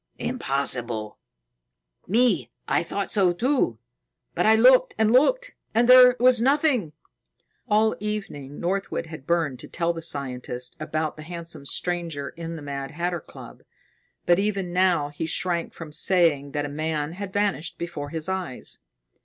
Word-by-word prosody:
"Impossible. 120 -6 -1 0.9
Me, 235 +5 +2 0.2
I - - +2
thought - - -4
so, 195 -5 +3
too. 245 - +1 0.6
But - - +1
I 220 - +7
looked 250 +3 +5
and 220 0 +3
looked, - - +3 0.2
and 235 +1 +4
there 250 0 +8
was 250 -1 +5
nothing." 265 - +2 0.7
All 220 0 +3
evening 195 -10 -5
Northwood 190 0 -2
had 160 -4 -10
burned 160 -7 0
to - - -8
tell 170 0 -1
the 165 - -6
scientist 125 -5 -4
about 155 0 -3
the - - -8
handsome 165 -3 -8
stranger 170 -5 -2
in 165 0 -7
the 155 - -8
Mad 140 -1 -5
Hatter 175 +2 -3
Club. - - -13 0.6
But 175 +1 +4
even 195 -3 -1
now 180 -5 +2
he 150 +2 -4
shrank 170 +1 -1
from 165 -2 -10
saying 155 -4 +2
that 145 0 -1
a 145 +1 -7
man 150 -1 -2
had 190 +2 -6
vanished 200 -5 -1
before 160 -4 -5
his 160 +1 -3
eyes. 185 -8 -3
170 Hz, 150 wpm, -25 LUFS, 145-210 Hz, 0.9 s, there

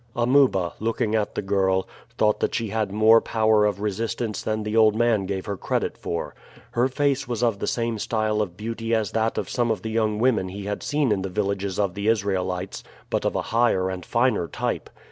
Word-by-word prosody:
Amuba, 120 -7 +3
looking 110 0 -1
at 110 -2 0
the - - -2
girl, 95 -1 +1 0.3
thought 105 -1 +2
that - - 0
she 115 -2 -1
had 110 -1 -1
more 110 +2 +6
power 110 -1 +3
of 100 -2 -2
resistance 110 +1 -2
than 110 0 -2
the 105 +1 -3
old 110 -1 +5
man 110 -4 +2
gave 95 -1 -3
her 100 - -3
credit - - -2
for. 85 - -4 0.4
Her 120 +2 +2
face 135 0 0
was 120 -1 -2
of 115 -4 +1
the - - -3
same 115 -2 -1
style 110 -1 0
of 90 -4 -4
beauty 115 +1 -2
as 110 -3 -1
that 115 0 0
of - - -2
some 120 -2 0
of 110 - -1
the 110 - -3
young 110 -1 +1
women 110 -5 +2
he 100 +2 -7
had 105 0 -3
seen 145 -4 0
in 100 -2 +1
the 95 - -3
villages 100 -1 -2
of 100 -3 0
the 100 +2 -3
Israelites, 95 -4 -1 0.3
but - - 0
of - - 0
a - - +1
higher 115 -6 +2
and 90 -1 -6
finer 120 -6 +1
type. - - -3
110 Hz, 215 wpm, -24 LUFS, 100-115 Hz, 0.4 s, more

